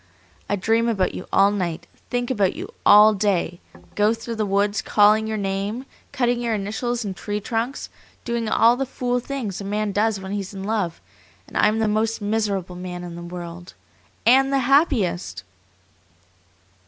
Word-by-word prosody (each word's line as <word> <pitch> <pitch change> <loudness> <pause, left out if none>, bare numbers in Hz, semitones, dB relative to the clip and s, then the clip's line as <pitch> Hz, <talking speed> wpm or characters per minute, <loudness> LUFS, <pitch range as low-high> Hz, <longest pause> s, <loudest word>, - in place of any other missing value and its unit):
I 205 - +2
dream 225 +4 +1
about 195 -5 0
you 185 - -7
all 195 +1 +5
night, 175 -4 -3 0.2
think 245 +1 -1
about 205 -7 +1
you - - -7
all 210 +1 +8
day, 190 -4 0 0.3
go 210 +2 +2
through 225 +1 -6
the 215 -2 -1
woods 200 +1 +1
calling 215 +1 +4
your 220 0 -2
name, 200 +5 -3 0.3
cutting 245 -3 0
your 230 -2 0
initials 220 +4 -2
in 195 - -3
tree 205 +3 -4
trunks, 230 +5 -3 0.4
doing 235 -2 -1
all 230 +2 +5
the 270 +1 -2
fool 245 -1 -1
things 240 -7 -4
a - - -5
man 205 +1 -1
does 210 +1 +1
when 190 0 -7
he's 200 -1 -4
in 195 - -6
love, 200 -5 -2 0.5
and - - -15
I - - +4
am 215 - +1
the 225 -1 +1
most 215 +1 0
miserable 205 -4 -1
man 180 0 -6
in 175 -1 -7
the 170 - -8
world 175 0 -8 0.5
and 270 +3 +5
the 275 - +3
happiest!" 215 - +1
210 Hz, 175 wpm, -23 LUFS, 195-230 Hz, 0.5 s, all